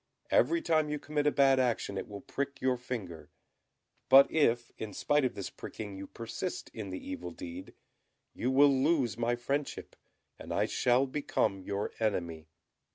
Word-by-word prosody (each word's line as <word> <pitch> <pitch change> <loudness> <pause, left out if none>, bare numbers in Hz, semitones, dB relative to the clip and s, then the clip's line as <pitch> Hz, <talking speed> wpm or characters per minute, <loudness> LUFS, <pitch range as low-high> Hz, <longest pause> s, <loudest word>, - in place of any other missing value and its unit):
Every 335 -1 +3
time 155 - +2
you 150 - -1
commit 150 0 -1
a - - +5
bad 135 -2 +4
action 120 -5 0
it - - -4
will 100 -1 -8
prick 140 0 -4
your 130 0 +2
finger; 115 -10 -6 0.8
but 135 +1 +8
if 120 -6 +2
in 110 -2 -5
spite 145 -1 +2
of 125 - -1
this 100 - -5
pricking 105 -3 -7
you 95 0 -7
persist 115 +11 -5
in 105 -4 -6
the 95 - -7
evil 90 -1 -5
deed, 85 +2 -9 0.6
you 125 - -1
will 140 +2 +6
lose 135 - +2
my 120 +1 0
friendship, 140 +4 -3 0.4
and - - -8
I - - +2
shall 125 +2 +2
become 120 -8 -1
your 100 +2 -3
enemy." 85 -8 -2
120 Hz, 165 wpm, -31 LUFS, 100-140 Hz, 0.8 s, but